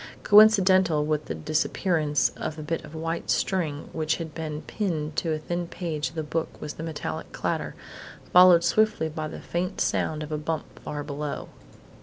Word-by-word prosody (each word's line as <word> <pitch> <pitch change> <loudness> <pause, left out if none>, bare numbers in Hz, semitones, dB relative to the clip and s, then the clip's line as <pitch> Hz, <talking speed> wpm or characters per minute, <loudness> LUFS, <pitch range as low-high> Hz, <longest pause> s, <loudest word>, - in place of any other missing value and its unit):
Coincidental 190 -7 +6
with 150 0 -1
the 80 - -4
disappearance 155 - +1
of 155 - -6
a 155 - -6
bit 165 +2 -3
of 155 +1 -11
white 165 +1 -3
string 160 -6 0
which 155 -1 0
had 160 -2 -6
been 155 -2 -5
pinned 155 -7 -3
to 165 - 0
a 155 - 0
thin 175 +3 -3
page 155 -6 -3
of - - -18
the 160 - -2
book 160 +2 -3
was 150 - -5
a - - -3
metallic 150 - -5
clatter, - - -2 0.6
followed 180 -1 +8
swiftly 170 -2 +2
by 155 0 -4
the - - -8
faint 180 +2 -3
sound 155 -1 0
of 155 - -8
a 150 - -1
bump 160 +1 -4
far 145 -1 -5
below. 145 0 -5
160 Hz, 180 wpm, -26 LUFS, 150-170 Hz, 0.6 s, followed